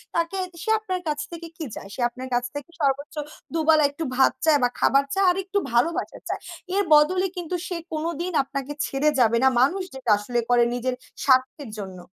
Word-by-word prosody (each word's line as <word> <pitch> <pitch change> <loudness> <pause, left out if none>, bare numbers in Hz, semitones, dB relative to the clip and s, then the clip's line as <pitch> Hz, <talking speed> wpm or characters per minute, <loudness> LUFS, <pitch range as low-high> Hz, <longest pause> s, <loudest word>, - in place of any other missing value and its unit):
তাকে 335 +3 0 0.2
সে 440 - -4
আপনার 370 -4 -3
কাছ 300 -1 -1
থেকে 335 0 -7
কি 320 - -4
চায়? 195 - -8
সে 255 - -5
আপনার 255 +2 -8
কাছ 245 0 +2
থেকে 290 +3 -6
সর্বোচ্চ 280 +2 0 0.4
২ 330 - 0
বেলা 310 -1 +6
একটু 305 +3 -5
ভাত 265 - +4
চায় 300 -2 +5
বা 245 - +4
খাবার 275 +1 +4
চায় 390 0 +2
আরেকটু 385 +2 -2 0.2
ভালোবাসার 300 +9 0
চায়। - - -2 0.4
এর 405 - +3
বদলে 365 +6 +4
কিন্তু 355 0 -3
সে 355 - -3 0.2
কোনোদিন 335 +3 -2
আপনাকে 275 +1 -5
ছেড়ে 275 +3 +1
যাবে 235 -1 +4
না 265 - +6
মানুষ 350 +10 +2
যেটা 255 -3 -4
আসলে 240 +4 -2
করে 245 -1 +5
নিজের 250 +1 -1 0.3
স্বার্থের 260 0 +2
জন্য। 190 -3 -8
290 Hz, 195 wpm, -24 LUFS, 255-335 Hz, 0.4 s, বেলা